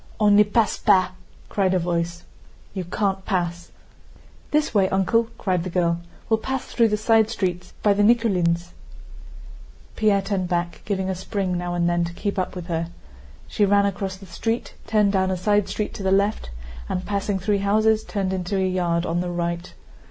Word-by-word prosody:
"On 205 -1 +5
ne 210 - +8
passe 210 +1 +1
pas!" 185 -3 +4 0.2
* - - -26
cried 190 -2 +1
a - - +4
voice. 170 0 -2 0.2
* - - -28
"You 190 -3 -4
can't 195 +1 -1
pass!" 175 -3 -2 0.8
"This 300 -4 +1
way, 195 -3 +3
uncle," 210 +5 +2
cried 180 -3 0
the 185 - -4
girl. 170 -1 +1 0.3
"We'll 220 -1 +2
pass 265 +3 -3
through 230 -2 +2
the 210 -1 0
side 220 0 +3
street, 180 -5 -2
by 205 - +5
the 200 - +1
Nikúlins'!" 185 -7 +2 1.3
Pierre 205 -2 +2
turned 195 -2 -1
back, 175 -1 -2
giving 190 -2 -1
a 190 - 0
spring 185 0 -2
now 175 0 -2
and 170 -1 +1
then 175 0 +1
to 170 - -6
keep 200 +2 -2
up 185 - -2
with 180 -2 -6
her. 165 -1 -2 0.6
She 210 - 0
ran 200 0 +4
across 195 -1 -2
the 195 +1 -13
street, 225 +6 -3
turned 210 -2 +3
down 190 -1 +1
a 185 - -1
side 205 +2 +1
street 210 - -3
to - - -7
the 190 0 0
left, 200 - +1 0.4
and, 180 0 -2
passing 200 0 -1
three 200 +2 0
houses, 215 +2 +2
turned 195 -2 -2
into 185 +1 -2
a 190 -1 +1
yard 175 -2 0
on 170 +1 -1
the 180 - -3
right. 170 0 -3
190 Hz, 195 wpm, -23 LUFS, 175-210 Hz, 1.3 s, ne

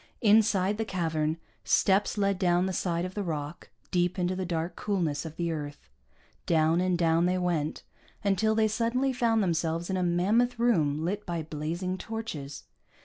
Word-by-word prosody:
Inside 210 -2 +3
the - - +1
cavern, 160 -5 -1 0.3
steps 200 +2 +2
led 200 -2 +1
down 180 -1 +3
the 190 - -2
side 175 -1 -1
of 185 - -6
the 205 - -3
rock, 155 -3 -5 0.2
deep 180 +1 +1
into 180 0 0
the 185 -1 -3
dark 170 0 -2
coolness 170 -8 -1
of 160 -1 -7
the 170 0 -1
earth. 145 - -6 0.6
Down 160 +1 +3
and 185 -1 +1
down 165 0 +3
they 180 +1 +1
went, 170 -4 -1 0.4
until 215 +2 +2
they 220 0 +3
suddenly 235 +5 0
found 230 -3 +2
themselves 170 0 -1
in 190 - 0
a - - 0
mammoth 200 +8 +2
room 160 -11 +2
lit 200 +4 -2
by 170 -2 -2
blazing 165 +5 -3
torches. 170 -12 -6
180 Hz, 170 wpm, -28 LUFS, 165-205 Hz, 0.6 s, Inside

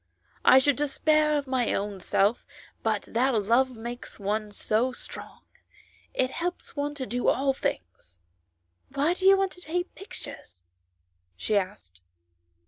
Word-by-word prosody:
" - - -36
I - - +8
should 270 0 +4
despair 300 +1 +2
of 285 - -2
my 255 -3 +1
own 200 -1 -3
self, 200 +5 +1 0.3
but 215 -2 0
that 250 +2 +1
love 235 +4 +2
makes 240 +2 -7
one 210 +1 -1
so 220 +5 +1
strong; - - -9 0.7
it 255 0 0
helps 350 +1 -4
one 290 0 -2
to 265 -3 -4
do 245 +3 -2
all 270 0 +3
things." 90 - -5 0.4
" 90 - -34
Why 295 +5 +2
do 375 +1 +1
you 390 0 +8
want 390 -1 +1
to 360 - -12
paint 355 +2 -3
pictures 365 - -10 0.3
?" 90 0 -47
she 210 - -1
asked. 185 - -3
245 Hz, 155 wpm, -27 LUFS, 200-290 Hz, 0.7 s, I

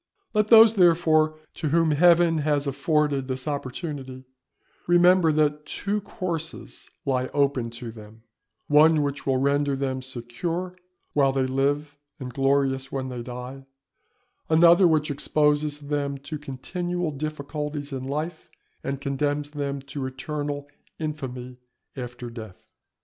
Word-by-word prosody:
Let 210 -1 +2
those 225 0 +8
therefore 165 -5 +4 0.2
to 155 - -3
whom 165 +1 +3
Heaven 170 +1 +5
has 145 -1 +1
afforded 145 -2 0
this 130 +1 -3
opportunity, 135 -2 -5 0.6
remember 175 -1 +5
that 150 0 +1
two 205 +1 -2
courses 170 -5 -5 0.2
lie 130 -2 0
open 140 -4 +1
to 120 0 -7
them; 110 0 -14 0.4
one 150 +1 +5
which 140 0 -4
will 135 -1 +2
render 140 +1 +1
them 135 -1 -2
secure 130 +9 -4 0.4
while 140 -2 +3
they 135 -1 0
live 145 +3 -1 0.2
and 125 -2 -7
glorious 135 0 +1
when 130 -1 -3
they 125 -2 -5
die; 125 +2 -8 0.8
another 170 +3 +6
which 155 -2 +2
exposes 150 +1 +1
them 145 -1 -3
to 145 +2 -7
continual 175 +5 -3
difficulties 150 0 -4
in 130 -1 -4
life, 155 +4 -4 0.3
and 140 0 -3
condemns 145 +1 -1
them 140 -2 -4
to 140 -1 -5
eternal 145 +2 -4 0.3
infamy 130 -5 -5 0.4
after 120 -1 -7
death. 110 -5 -11
145 Hz, 130 wpm, -25 LUFS, 135-155 Hz, 0.8 s, those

